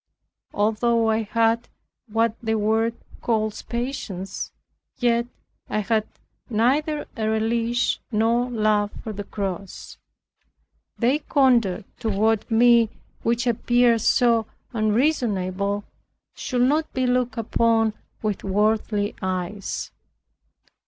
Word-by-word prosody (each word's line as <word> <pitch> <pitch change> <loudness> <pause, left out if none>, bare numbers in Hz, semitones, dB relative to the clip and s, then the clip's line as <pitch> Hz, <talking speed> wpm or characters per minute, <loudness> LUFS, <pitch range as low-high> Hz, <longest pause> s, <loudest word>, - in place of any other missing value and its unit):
Although 225 +2 +2
I 220 +1 +1
had 230 +2 +1 0.4
what 225 +1 +1
the 220 -1 0
world 220 +2 +1 0.3
calls 215 -2 0
patience, 220 -6 -4 0.5
yet 235 -1 +2 0.4
I 215 - 0
had 215 +1 0 0.4
neither 280 +7 +1
a 220 -3 -1
relish 230 +2 0
nor 230 +3 +2
love 215 -3 +1
for 220 - -5
the 205 0 -5
cross. 195 -2 -6 1.0
Their 260 +5 +2
conduct 235 -10 +1
toward 220 -1 +1
me, 235 0 +5 0.3
which 235 +2 0
appeared 240 0 +3
so 230 -1 +3 0.3
unreasonable, 205 -5 0 0.5
should 245 -2 -1
not 305 +5 +2
be 260 0 0
looked 245 -2 0
upon 225 0 +2 0.3
with 210 -2 -2
worldly 210 +1 +1
eyes. 185 +1 -3
225 Hz, 100 wpm, -24 LUFS, 210-240 Hz, 1.0 s, me